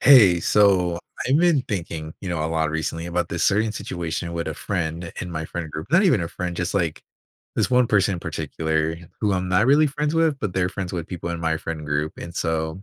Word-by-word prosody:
Hey, 105 -11 +7
so 90 -4 +3 0.3
I've 130 +3 +4
been 170 -5 +4
thinking, 80 -7 -4
you 95 - -5
know, 80 -3 -1
a - - +1
lot 80 -1 0
recently 80 +2 -3
about 85 0 -1
this 85 - -2
certain 105 +2 +2
situation 85 -3 -4
with 85 -1 -3
a 80 - -3
friend 85 -2 -3
in 90 - -5
my 80 -1 -3
friend 80 -1 -5
group. 75 +2 -6
Not 180 +5 +5
even 140 - +4
a 85 - -2
friend, 90 -1 -4
just, 85 +1 -2
like, 85 -6 0 0.5
this - - +1
1 125 -1 +4
person 100 -3 +3
in 85 - -6
particular 80 0 -1 0.2
who 105 -2 +2
I'm 90 -1 -1
not 90 +5 +3
really 145 +3 +5
friends 150 +2 -1
with, 165 -3 +2
but 105 -7 -3
they're 90 -1 +1
friends 95 -1 -5
with 85 -1 -4
people 85 -2 -4
in 85 -1 -4
my 80 -1 +1
friend 80 -1 -5
group. 75 +1 -1
And 85 0 -7
so 80 +1 -2
90 Hz, 230 wpm, -23 LUFS, 80-105 Hz, 0.5 s, Hey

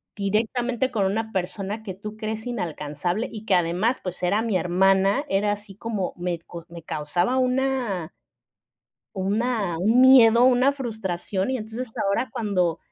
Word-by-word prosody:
directamente 235 +5 -1
con 210 -5 +1
una 220 +3 -1
persona 195 +3 -3
que 195 - -5
tú 210 +3 -8
crees 220 +1 -4
inalcanzable, 175 - -3
y 220 -1 -8
que 200 - +1
además, 180 +8 +1
pues, 180 -1 -6
era 200 +5 +2
mi 225 -5 0
hermana, 195 +7 +3
era 205 +1 +1
así 205 -1 -10
como 210 -4 -3
me 175 -1 -2
co 170 0 -11
me 170 -1 -10
causaba 175 - -1
una 255 -9 0 1.0
una 200 -2 -1
un 220 +8 +3
miedo, 245 -2 +7
una 260 +2 +4
frustración. 210 -5 -3
Y 260 - 0
entonces 225 +2 -6
ahora 200 +6 0
cuando 185 -7 0
210 Hz, 150 wpm, -24 LUFS, 180-235 Hz, 1.0 s, miedo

